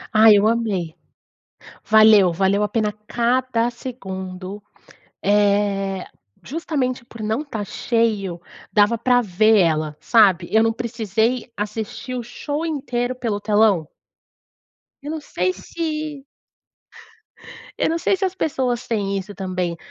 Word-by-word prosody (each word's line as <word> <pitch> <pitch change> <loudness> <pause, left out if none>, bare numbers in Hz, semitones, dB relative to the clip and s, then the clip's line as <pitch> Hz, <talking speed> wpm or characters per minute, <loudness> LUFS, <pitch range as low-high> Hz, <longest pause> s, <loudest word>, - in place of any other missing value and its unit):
Ah, 220 +1 +8
eu 205 +1 +5
amei! 205 -8 -1 0.9
Valeu, 215 -4 +6
valeu 195 +4 +1
a 210 - +1
pena 215 -2 0 0.2
cada 240 0 +1
segundo, 195 -5 -7 0.6
eh, 200 -2 +1 0.4
justamente 275 -6 -3
por 230 -2 -10
não 220 +5 -1
estar 230 -9 -5
cheio, 210 -5 -1 0.3
dava 210 +2 +3
para 245 +1 +3
ver 215 +2 +3
ela, 155 -3 +1
sabe? 195 -7 +4
Eu 220 - +6
não 225 0 +1
precisei 230 +1 -1
assistir 215 +4 -5
o 245 - -3
show 290 +6 -4
inteiro 255 -5 -2
pelo 225 -5 -3
telão. 205 -6 +2 1.2
Eu 295 - -5
não 320 - -3
sei 185 - -1
se 305 - -5 1.5
Eu - - +1
não 330 - 0
sei 385 - +1
se 385 - -5
as 375 0 -1
pessoas 255 -8 -1
têm 200 -3 -1
isso 195 +2 -6
também, 185 -2 -3
220 Hz, 125 wpm, -21 LUFS, 195-245 Hz, 1.5 s, Ah